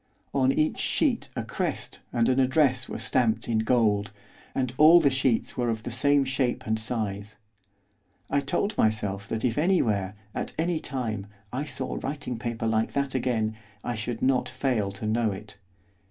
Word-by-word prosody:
On 130 -1 +3
each 155 +3 +1
sheet - - +1
a - - -2
crest - - -4
and 115 -1 +2
an 130 +1 +3
address 130 -1 +3
were - - -4
stamped 120 -3 +1
in 115 -2 +1
gold, 110 -3 +2 0.5
and 130 -2 -1
all 160 +3 +8
the 145 -4 +3
sheets 130 -3 +1
were 120 -1 0
of 110 -1 -2
the 120 - -5
same 140 +3 +3
shape 130 -2 -1
and 110 0 0
size. 110 -2 -2 0.9
I 145 - +1
told 175 +9 -1
myself 100 -2 +1
that 110 +1 -1
if 120 +2 +1
anywhere, 110 - +1 0.2
at - - -4
any 165 0 0
time, 110 -9 -4 0.3
I 135 +4 -2
saw 130 -3 -3
writing 135 -4 -4
paper 115 -1 -3
like 110 0 +1
that 140 -1 -1
again, 115 -4 0 0.3
I 120 - -2
should 110 +1 -4
not 130 -1 +2
fail 115 -8 0
to 100 +2 -6
know 110 0 +1
it. 105 +2 -10
120 Hz, 170 wpm, -27 LUFS, 110-135 Hz, 0.9 s, all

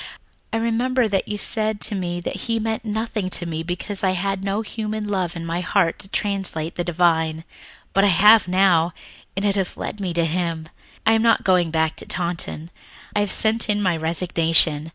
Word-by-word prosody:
I - - -1
remember 235 +2 0
that 195 -2 -1
you 210 - -3
said 215 0 0
to 215 - +2
me 175 -3 -3
that - - -5
he 230 -1 0
meant 220 +1 -3
nothing 215 -2 -3
to 175 - -2
me 160 -1 -4
because 180 +4 -5
I 190 -1 +2
had 195 +1 -2
no 200 +2 -2
human 215 -1 -5
love 185 -4 -2
in 165 0 -6
my 165 +1 -3
heart 180 -1 0
to 195 - -5
translate 190 -6 -3
the 175 - -3
divine. 160 -2 0 0.5
But 195 - +3
I - - +5
have 210 +3 +5
now, 180 -3 +2 0.4
and 200 - -1
it 200 -1 +1
has 190 -3 -2
led 210 - -6
me 190 -3 -3
to 170 -1 +1
Him. 165 -1 -3 0.4
"I 220 - +4
am 225 - +2
not 230 0 +3
going 180 -3 +2
back 160 0 -1
to - - -11
Taunton. 170 -2 -4 0.4
I - - +2
have 205 -2 -1
sent 225 +1 +6
in 210 0 +2
my 185 -4 +1
resignation. 160 -1 +2
185 Hz, 200 wpm, -21 LUFS, 170-210 Hz, 0.5 s, sent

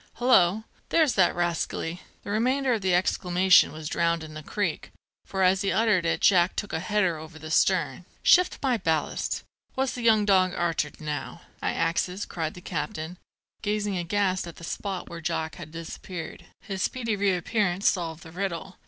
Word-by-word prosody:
Hullo, 220 -5 +4 0.3
there's 315 -5 +3
that 185 -3 +3
rascally 170 0 -2
" - - -35
The 200 - -5
remainder 255 +4 +2
of 220 - -1
the 185 -2 +2
exclamation 180 0 +4
was 155 0 -7
drowned 170 0 0
in 155 -1 -9
the 155 - -7
creek, 185 +1 -3 0.4
for 190 -1 -1
as 185 +1 +4
he 195 - +1
uttered 210 -6 +2
it - - 0
Jack 180 -2 +4
took 205 - -4
a 160 - 0
header 185 -3 0
over 155 +1 -10
the 155 0 -8
stern. - - +2 0.2
"Shift 365 0 +5
my 255 -3 +2
ballast, 160 -6 -1 0.3
what's 265 0 0
the 245 - -5
young 220 -3 +4
dog 185 -2 +3
arter 165 -3 0
now? 150 -2 -5 0.2
I - - 0
axes," 180 +3 -1
cried 160 -2 -4
the 180 - -10
captain, 175 -2 -4 0.4
gazing 210 -1 -1
aghast 185 +1 0
at 170 - -9
the - - -13
spot 190 +2 -4
where 170 -1 -8
Jack 160 -1 -2
had 165 -4 -9
disappeared. 165 +1 -7
His 195 -2 -5
speedy 230 -2 -1
reappearance 195 0 +1
solved 165 -3 0
the 160 - -11
riddle. 190 +1 -4
185 Hz, 180 wpm, -26 LUFS, 165-205 Hz, 0.4 s, Shift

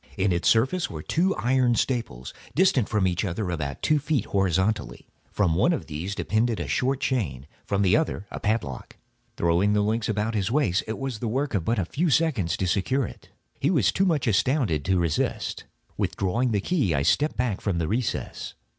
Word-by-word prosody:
In 95 0 +2
its 85 -1 +2
surface 130 +11 +2
were 75 -1 -7
two 185 +4 +1
iron 125 -1 +2
staples, 115 - -2 0.2
distant 150 - +3
from 105 -3 +1
each 90 -1 0
other 95 0 -2
about 70 -5 -4
two 155 -1 +3
feet, 145 -5 -1
horizontally. 95 +2 0 0.2
From 95 -6 +1
one 95 - +3
of 160 - -3
these 85 +6 -5
depended 110 +1 0
a - - -3
short 135 +1 0
chain, 75 - -1 0.2
from 100 -1 +1
the 95 +1 +4
other 155 -10 -1
a - - -5
padlock. 105 - -3 0.4
Throwing 85 +5 +2
the 105 0 +2
links 110 +2 0
about 110 +1 -1
his 100 -2 0
waist, 115 -8 +1
it 110 - -3
was 135 -4 -4
but - - -18
the 120 - -1
work 135 +6 -1
of 95 -3 -1
a 105 -6 +1
few 160 - 0
seconds 130 - +1
to 95 - -1
secure 105 +9 +1
it. - - -11 0.3
He 140 - +1
was 125 - +3
too 195 - +1
much 155 -7 +1
astounded 110 - +1
to 95 0 +2
resist. 85 -3 -1 0.3
Withdrawing 115 +7 0
the 105 -3 0
key 125 - +1
I 70 - +1
stepped 95 - +2
back 120 -5 -1
from 100 -5 -1
the 80 -2 -1
recess. 115 +3 -3
105 Hz, 200 wpm, -25 LUFS, 90-130 Hz, 0.4 s, the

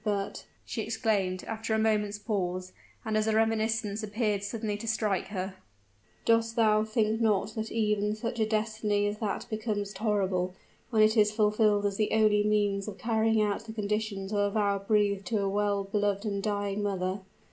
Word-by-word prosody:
But," 200 -2 -2 0.2
she 225 - -3
exclaimed, 210 -4 0
after 225 0 -2
a - - +2
moment's 210 -2 +1
pause, 185 -4 -2 0.3
and 220 -1 -1
as 215 0 +2
a 220 - +2
reminiscence 220 -1 +1
appeared 210 -1 -1
suddenly 210 0 -3
to 230 +2 -7
strike 215 -4 0
her, 190 -1 -4 0.7
"dost 230 0 +3
thou 215 -2 +4
not 215 +1 -2
think 220 0 +1
that 220 +1 0
even 210 -2 +1
such 230 +2 -4
a 220 - +2
destiny 215 -1 0
as 205 +1 -2
that 205 -4 -2
becomes 215 -3 -3
tolerable, 190 -3 0 0.3
when 220 -3 +4
it 215 +1 +4
is 210 -1 +4
fulfilled 210 -1 +2
as 200 -1 0
the 215 0 0
only 215 -1 +4
means 205 -1 +1
of 205 -2 -6
carrying 225 -1 +2
out 205 +1 -1
the 220 - -7
conditions 210 -2 -2
of 205 - 0
a 205 0 +2
vow 200 -1 +1
breathed 200 -1 +1
to 220 -3 0
a 200 - 0
well 200 0 +1
beloved 205 +1 -1
and 200 -2 -1
dying 205 -1 -1
mother? 190 -1 -1
210 Hz, 180 wpm, -29 LUFS, 200-220 Hz, 0.7 s, thou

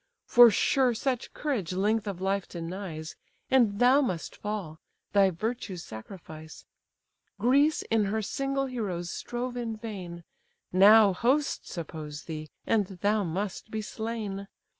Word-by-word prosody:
For 240 -1 +8
sure 250 +4 +2
such 250 +1 -2
courage 245 - -2
length 210 +3 +1
of 195 -3 -4
life 195 0 -1
denies, 165 -2 -6 0.4
And 235 -6 +4
thou 255 +5 +5
must 185 - -3
fall, 200 -7 -5 0.3
thy 200 -2 +5
virtue's 190 -1 -4
sacrifice. 155 - -10 0.7
Greece 280 +8 +3
in 220 -2 +3
her 215 +2 -1
single 275 +4 -1
heroes 195 -9 -3
strove 245 +1 -4
in 230 -2 -3
vain; 185 -6 -7 0.5
Now 205 +2 +7
hosts 260 0 0
oppose 155 -2 -6
thee, 155 -2 -6 0.2
and 210 -4 +2 0.2
thou 210 +1 +3
must 190 +5 -4
be 215 0 -3
slain. 215 -3 -4
205 Hz, 130 wpm, -28 LUFS, 180-235 Hz, 0.7 s, For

